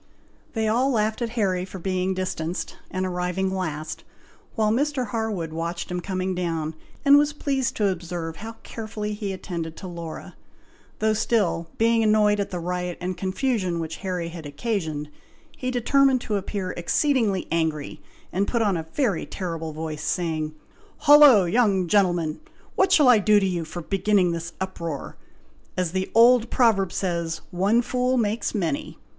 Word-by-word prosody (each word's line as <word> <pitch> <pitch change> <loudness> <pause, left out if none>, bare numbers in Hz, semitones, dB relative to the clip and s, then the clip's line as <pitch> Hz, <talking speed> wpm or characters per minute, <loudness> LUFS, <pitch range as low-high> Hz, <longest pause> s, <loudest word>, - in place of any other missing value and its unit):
They 220 -1 0
all 245 +5 +2
laughed 220 -2 0
at 235 - -1
Harry 185 -4 +1
for 190 +1 -8
being 185 +1 -1
distanced, 180 -2 -3
and 185 0 -2
arriving 180 +1 -1
last; 155 -4 -4 0.5
while 215 -2 +2
Mr. 270 +2 0
Harwood 205 -8 -2
watched 170 +2 -4
him 180 - -1
coming 185 0 -2
down, 165 -3 -2 0.3
and 285 +1 +8
was 295 0 +1
pleased 270 -3 -1
to 210 - +2
observe 170 -2 -4
how 225 +2 -7
carefully 210 -1 -5
he 205 -1 -4
attended 170 -4 -5
to 190 - -7
Laura, 170 -2 -7 0.6
though 220 0 +2
still, 205 -7 0
being 230 0 +3
annoyed 210 -1 +4
at 200 - -1
the 180 - -4
riot 180 0 -3
and 180 +1 -3
confusion 190 -3 -1
which 160 0 -4
Harry 180 -3 -3
had 165 -3 -8
occasioned, 155 -2 -3 0.5
he 255 - -3
determined 255 +1 +3
to 215 - -2
appear 195 -1 -3
exceedingly 210 - +1
angry, 160 -3 -1 0.3
and 195 +2 +1
put 235 -2 +1
on 200 -3 +2
a 160 -1 -4
very 235 - 0
terrible 165 -4 -4
voice, 155 -1 -5
saying, 155 -3 -2 0.5
"Hollo! 290 -9 +8
young 200 -1 +2
gentleman! 175 -5 +2 0.4
what 380 0 +3
shall 300 -7 +6
I 245 -3 +7
do 210 +1 +5
to 195 - 0
you 175 -3 -2
for 170 +2 -7
beginning 195 0 +2
this 170 0 -4
uproar? 170 -6 -5 0.6
As 180 -3 0
the 190 +1 -2
old 235 +1 +6
proverb 200 -7 +3
says, 170 -3 -2
'one 200 +7 +2
fool 250 +1 0
makes 225 0 0
many.' 215 - -2
190 Hz, 160 wpm, -24 LUFS, 170-225 Hz, 0.6 s, and